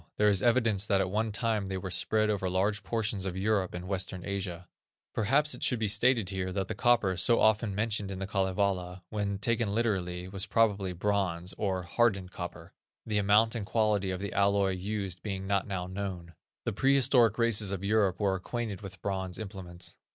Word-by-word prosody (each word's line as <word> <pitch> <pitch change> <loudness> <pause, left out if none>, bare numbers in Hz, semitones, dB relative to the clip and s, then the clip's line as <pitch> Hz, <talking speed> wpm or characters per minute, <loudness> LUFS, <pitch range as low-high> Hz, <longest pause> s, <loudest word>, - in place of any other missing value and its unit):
There 105 0 +4
is 100 -2 +3
evidence 115 -4 +2
that 100 - +3
at 95 -1 0
one 110 +2 0
time 110 -1 -1
they 95 0 -3
were 95 0 -5
spread 110 +3 +1
over 95 -3 -1
large 100 +3 0
portions 105 -1 -2
of 95 -1 -4
Europe 95 -2 0
and 90 +1 -6
western 95 -2 -3
Asia. 90 -3 -4 0.5
Perhaps 140 +7 +2
it - - -5
should 125 - +2
be 110 -1 0
stated 105 0 +3
here 95 -1 -3
that 95 0 -2
the - - -3
copper, 120 -6 +2
so 95 +7 +3
often 110 -2 +2
mentioned 105 -1 -1
in 95 - -5
The 95 - -3
Kalevala, 95 -2 -1
when 100 -2 -2
taken 110 0 0
literally, 90 -6 -1
was 95 +1 -3
probably 105 -3 +2
bronze, 95 -2 -1
or 95 -2 -1
"hardened 95 -1 +1
copper," 90 -2 -8 0.3
the 105 -2 0
amount 105 +3 +4
and 115 -3 -3
quality 105 -2 +1
of 95 -1 -3
the 100 +1 -5
alloy 100 -1 +3
used 95 -1 -4
being 95 -2 -4
not 100 0 0
now 95 -3 -3
known. 90 -3 -5 0.3
The - - -2
prehistoric 130 -2 +4
races 110 -4 +2
of 100 -1 -4
Europe 100 -2 +2
were 100 -2 +2
acquainted 105 +2 -4
with 95 -3 -10
bronze 95 -2 -2
implements. 95 -5 -5
100 Hz, 190 wpm, -30 LUFS, 95-110 Hz, 0.5 s, There